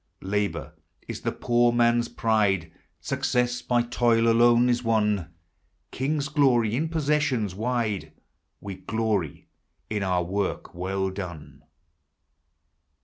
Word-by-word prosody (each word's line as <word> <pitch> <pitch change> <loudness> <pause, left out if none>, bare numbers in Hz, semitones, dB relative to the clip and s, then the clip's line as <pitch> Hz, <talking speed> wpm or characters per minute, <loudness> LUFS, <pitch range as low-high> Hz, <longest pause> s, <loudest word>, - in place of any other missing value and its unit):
Labor 100 +1 -2 0.3
is - - -6
the - - -1
poor 120 0 +2
man's 120 0 +3
pride, 100 -7 +1 0.2
— - - -46
Success 125 0 0
by 120 -1 +1
toil 120 -1 +2
alone 120 +1 +5
is 120 0 +1
won. 105 -6 +1 0.6
Kings 145 +2 -1
glory 125 -7 +2
in 155 +5 -1
possessions 150 - 0
wide, 110 -6 -2 0.3
— - - -51
We 100 -2 -7
gloiy 105 -5 -2 0.5
in 105 -1 -1
our 90 -2 +1
work 95 +3 -3
well 95 +2 -2
done. 80 -7 -8
115 Hz, 120 wpm, -26 LUFS, 95-120 Hz, 0.6 s, alone